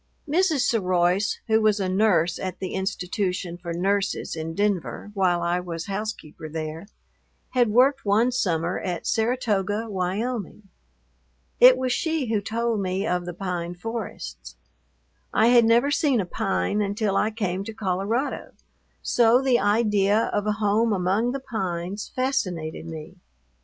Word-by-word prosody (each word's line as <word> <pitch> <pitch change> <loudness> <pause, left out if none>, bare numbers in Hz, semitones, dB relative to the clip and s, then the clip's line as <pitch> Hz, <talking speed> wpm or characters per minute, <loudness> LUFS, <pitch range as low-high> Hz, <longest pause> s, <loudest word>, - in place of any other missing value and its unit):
Mrs. 320 -2 +2
Seroise, 185 -3 +1
who 220 -1 +3
was 215 -1 +3
a 190 - 0
nurse 185 -3 +2
at 185 -1 -4
the 185 - -5
institution 190 -1 -2
for 175 -1 -7
nurses 195 +3 -1
in 160 0 -5
Denver 205 0 -1
while 180 -3 +1
I 175 +1 +1
was 170 -2 -5
housekeeper 195 -6 -5
there, 160 +3 -5 0.6
had 245 -3 +2
worked 265 +5 +4
one 220 +5 +3
summer 175 -7 0
at 175 -3 -4
Saratoga, 220 -3 0
Wyoming. 200 +2 -3 0.9
It 255 +1 +8
was 255 -1 -1
she 310 -6 -1
who 210 - +1
told 230 +1 -1
me 190 +1 -1
of 180 -3 -1
the 175 - -4
pine 175 -2 -4
forests. 180 - -6 0.8
I 225 +2 +4
had 240 -1 +6
never 235 +5 +4
seen 285 -4 +2
a 195 - 0
pine 195 +3 -1
until 205 0 -1
I 215 - +2
came 195 -4 -2
to 225 - -5
Colorado; 215 +6 -2 0.5
so 240 0 +4
the 260 -2 +3
idea 210 0 +2
of 205 0 0
a 210 - +2
home 215 +2 +1
among 195 +6 +1
the 275 - -3
pines 190 -4 -4
fascinated 185 - -2
me. 160 +3 -8
205 Hz, 145 wpm, -24 LUFS, 180-230 Hz, 0.9 s, It